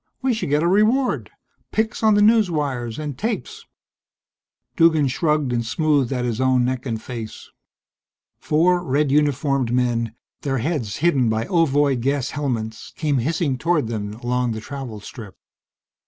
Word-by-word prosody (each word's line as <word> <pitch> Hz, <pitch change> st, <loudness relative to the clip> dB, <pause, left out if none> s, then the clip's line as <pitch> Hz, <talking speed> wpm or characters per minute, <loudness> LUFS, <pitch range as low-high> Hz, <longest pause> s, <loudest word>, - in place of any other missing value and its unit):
We 260 Hz, -2 st, +2 dB
should 220 Hz, -9 st, -3 dB
get 150 Hz, +2 st, +2 dB
a -, -, +2 dB
reward. 215 Hz, +8 st, +2 dB, 0.4 s
Pics 220 Hz, 0 st, -1 dB
on 215 Hz, -2 st, +4 dB
the 205 Hz, -, +4 dB
newswires 150 Hz, -, +1 dB
and 150 Hz, -3 st, -4 dB
tapes." 240 Hz, -, -4 dB, 1.1 s
Duggan 160 Hz, -4 st, +4 dB
shrugged 150 Hz, -1 st, 0 dB
and 120 Hz, -1 st, 0 dB
smoothed 140 Hz, +1 st, +1 dB
at 125 Hz, -2 st, -1 dB
his 120 Hz, 0 st, -2 dB
own 130 Hz, -1 st, +3 dB
neck 130 Hz, +1 st, -2 dB
and 115 Hz, -2 st, -2 dB
face. 115 Hz, -2 st, -8 dB, 0.9 s
Four 175 Hz, +3 st, +2 dB
red 145 Hz, -2 st, +1 dB
uniformed 140 Hz, -3 st, +1 dB
men, 120 Hz, -2 st, 0 dB, 0.3 s
their 135 Hz, -2 st, -1 dB
heads 125 Hz, -5 st, -2 dB
hidden 135 Hz, -9 st, +3 dB
by 110 Hz, +1 st, 0 dB
ovoid 145 Hz, -7 st, +2 dB
gas 135 Hz, 0 st, 0 dB
helmets, 115 Hz, -6 st, -4 dB
came 145 Hz, -4 st, +1 dB
hissing 145 Hz, 0 st, -1 dB
toward 155 Hz, -7 st, +1 dB
them 105 Hz, -2 st, -4 dB
along 120 Hz, 0 st, -1 dB
the 110 Hz, -, -5 dB
travel 125 Hz, -3 st, -7 dB
strip. 105 Hz, -3 st, -10 dB
140 Hz, 150 wpm, -22 LUFS, 120-165 Hz, 1.1 s, on